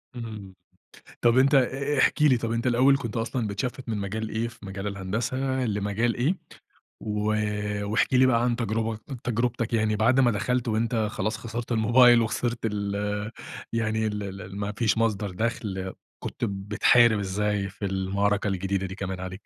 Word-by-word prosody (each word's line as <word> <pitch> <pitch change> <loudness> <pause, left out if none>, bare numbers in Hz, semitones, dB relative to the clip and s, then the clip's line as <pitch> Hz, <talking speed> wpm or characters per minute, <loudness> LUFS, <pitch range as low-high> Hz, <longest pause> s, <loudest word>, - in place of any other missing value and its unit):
إمم. 105 -5 -7 0.7
طب 120 +1 +4
أنت 140 +2 +5
أ 135 +2 +1
احكِ 150 - +3
لي، 135 -5 +5
طب 115 -1 -3
أنت 115 +2 -1
الأول 130 +3 +4
كنت 115 -4 -5
أصلًا 115 0 -1
بتشفِّت 125 +5 -4
من 110 - -1
مجال 110 +2 -3
إيه 115 +1 -1
في 115 -3 -12
مجال 95 +1 -5
الهندسة 100 +6 -3 0.3
لمجال 105 +2 0
إيه؟ 150 +10 +1 0.6
و 105 0 -3 0.7
واحكِ 120 +4 +1
لي 130 +1 +6
بقى 120 -2 +3
عن 120 -1 +2
تجربك 110 -1 -2 0.2
تجربتك 120 0 -1
يعني، 110 -1 +2
بعد 120 +5 +3
ما 120 -2 +5
دخلت 120 +4 -1
وأنت 115 +2 0 0.2
خلاص 110 0 -2
خسرت 115 +1 -6
الموبايل 120 +1 +6
وخسرت 120 +1 -1
ال 105 0 -2 0.4
يعني 110 -1 0
ال 100 -2 -4
ال 95 +1 -8
ما 100 +1 -2
فيش 115 -1 +2
مصدر 105 -3 0
دَخْل، 95 -3 -3 0.3
كنت - - -4
بتحارب 105 +3 +3
إزاي 100 0 -1
في 100 +1 -6
المعركة 100 +2 0
الجديدة 95 0 -1
دي 95 - -7
كمان 95 -2 -4
عليك؟ 95 0 -5
110 Hz, 165 wpm, -26 LUFS, 100-120 Hz, 0.7 s, لي